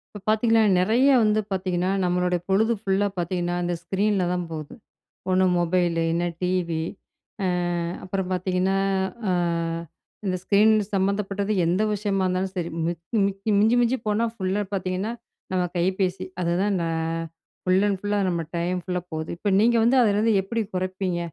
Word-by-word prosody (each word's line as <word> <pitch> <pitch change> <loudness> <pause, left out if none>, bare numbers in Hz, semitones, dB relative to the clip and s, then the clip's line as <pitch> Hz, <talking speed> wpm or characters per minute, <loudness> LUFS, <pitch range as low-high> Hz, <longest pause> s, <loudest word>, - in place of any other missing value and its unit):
இப்போ - - -6
பார்த்தீங்கன்னா 225 0 +4 0.2
நிறைய 225 +8 +3 0.2
வந்து 215 0 +3
பார்த்தீங்கன்னா, 185 -1 0
நம்மளுடைய 180 0 +1
பொழுது 215 +4 +3
ஃபுல்லா 195 0 +1
பார்த்தீங்கன்னா 175 0 -1
இந்த 175 0 -1
ஸ்க்ரீன்ல 195 +2 +1
தான் 180 0 -1
போகுது, 155 -2 -6 0.6
ஒண்ணு 185 0 +3
மொபைலு 175 -1 +1
இல்லனா 170 +1 0
டிவி, 180 -3 0 0.6
ஆ - - +2 0.6
அப்புறம் 190 0 -3
பார்த்தீங்கன்னா, 185 +1 0 0.5
ஆ - - +2 0.9
இந்த 185 -1 0
ஸ்க்ரீன் 210 +3 +4 0.2
சம்மந்தப்பட்டது 200 +1 0
எந்த 175 +4 +1
விஷயமா 200 -2 -1
இருந்தாலும் 185 +1 -1
சரி, 170 -1 -2 0.2
மிக் 170 -1 -5 0.2
மிக்கி 195 +2 -3
மிஞ்சி 220 +3 +4
மிஞ்சி 240 +2 +2
போனால் 225 +2 0
ஃபுல்லா 195 0 -1
பார்த்தீங்கன்னா, 185 +2 -2 0.4
நம்ம 185 -1 +2
கைபேசி. 185 +1 0 0.2
அதுதான் 185 +3 +1
நான் 165 0 -2 0.4
ஃபுல் 185 +2 +3
அண்ட் 200 -2 -1
ஃபுல் 205 0 -2
லா - - +2
நம்ம 170 -2 -1
டைம் 180 +2 -1
ஃபுல்லா 180 -2 -2
போகுது, 155 0 -4
இப்போ 200 +3 -1
நீங்க 235 +3 +4
வந்து 255 +3 +4
அதுலேருந்து 215 +1 +3
எப்பிடி 225 +3 -2
குறைப்பீங்க? 185 -1 -2
185 Hz, 150 wpm, -24 LUFS, 180-205 Hz, 0.9 s, பார்த்தீங்கன்னா